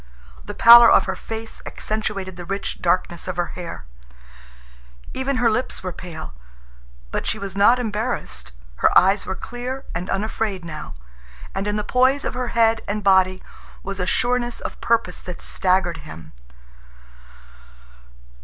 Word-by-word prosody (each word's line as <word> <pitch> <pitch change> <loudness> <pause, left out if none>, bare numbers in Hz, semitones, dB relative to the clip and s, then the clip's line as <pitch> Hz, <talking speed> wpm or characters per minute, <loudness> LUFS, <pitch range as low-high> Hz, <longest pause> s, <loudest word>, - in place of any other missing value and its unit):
The - - -8
pallor 235 0 +9
of - - +5
her - - -3
face 225 0 -7
accentuated 205 -4 -4
the 175 - -8
rich 195 +3 -4
darkness 175 -1 0
of 185 - -3
her 175 - -2
hair. 170 - -7 1.3
Even 265 +1 -1
her 245 -1 +2
lips 230 0 -1
were 185 -1 -4
pale. 165 - -8 0.8
But - - -3
she 220 - 0
was 200 -3 -6
not 205 +5 +5
embarrassed. 215 - -3 0.3
Her - - +4
eyes 195 +2 +4
were 190 - -2
clear 250 +5 -6
and 175 +3 -4
unafraid 205 -2 -2
now, 155 - -7 0.6
and 195 +1 -3
in 210 - -1
the 210 - -1
poise 260 +5 +2
of - - -2
her 250 0 -3
head 225 -1 +2
and 210 +1 -3
body 190 -1 +3 0.4
was 195 0 -5
a 180 - -1
sureness 245 +2 0
of - - -7
purpose 225 -6 0
that 180 -2 -8
staggered 185 -2 0
him. 80 - -11
200 Hz, 150 wpm, -22 LUFS, 180-230 Hz, 1.3 s, pallor